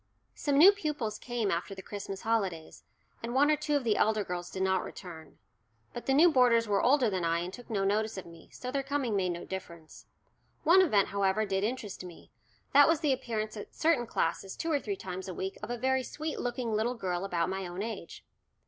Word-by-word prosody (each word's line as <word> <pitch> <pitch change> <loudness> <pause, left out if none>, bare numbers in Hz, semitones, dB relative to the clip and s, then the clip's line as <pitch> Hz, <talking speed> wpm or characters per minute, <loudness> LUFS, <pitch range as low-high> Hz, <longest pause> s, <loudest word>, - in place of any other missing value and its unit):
Some 285 -2 0
new 355 +7 +10
pupils 295 - -3
came 240 -5 -2
after 175 +4 -2
the 190 - -9
Christmas 195 -1 -6
holidays, 195 -8 -2 0.4
and 235 +2 -4
one 290 +3 +5
or - - +4
two 295 0 -1
of 285 - +1
the 220 -3 +2
elder 215 -1 +2
girls 175 -1 -5
did 190 - -3
not 190 -1 +1
return. 160 -4 -10 0.6
But 240 - -7
the 270 - +3
new 335 +4 +7
boarders 240 -4 +4
were 200 -1 +2
older 260 -1 +4
than 190 -4 -1
I 165 0 +1
and 180 +2 -5
took 245 +2 -11
no 205 -4 0
notice 215 +2 0
of 190 - -6
me, 165 -1 -14
so 250 - -6
their 275 +1 0
coming 270 -5 -1
made 185 -2 +1
no 175 0 -4
difference. 170 -4 -9 0.6
One 355 +4 +7
event, 210 - +3
however, 200 +2 +1
did 195 -1 -1
interest 215 -4 -3
me 175 -2 -12 0.4
that 285 +1 +8
was 325 -1 +2
the 295 -4 +3
appearance 220 -4 -3
at 205 - -9
certain 310 -7 +2
classes 190 0 -1
two 330 - -3
or 290 - +2
three 400 +7 -3
times 185 - -6
a 185 - -5
week 190 +3 -4
of - - -6
a 240 - -2
very 260 +2 +1
sweet 310 +4 -5
looking 245 -2 -2
little 225 +4 0
girl 185 -5 -2
about 175 -3 -1
my 190 -1 -3
own 175 +3 -5
age. 215 -6 -7
215 Hz, 220 wpm, -30 LUFS, 190-260 Hz, 0.6 s, new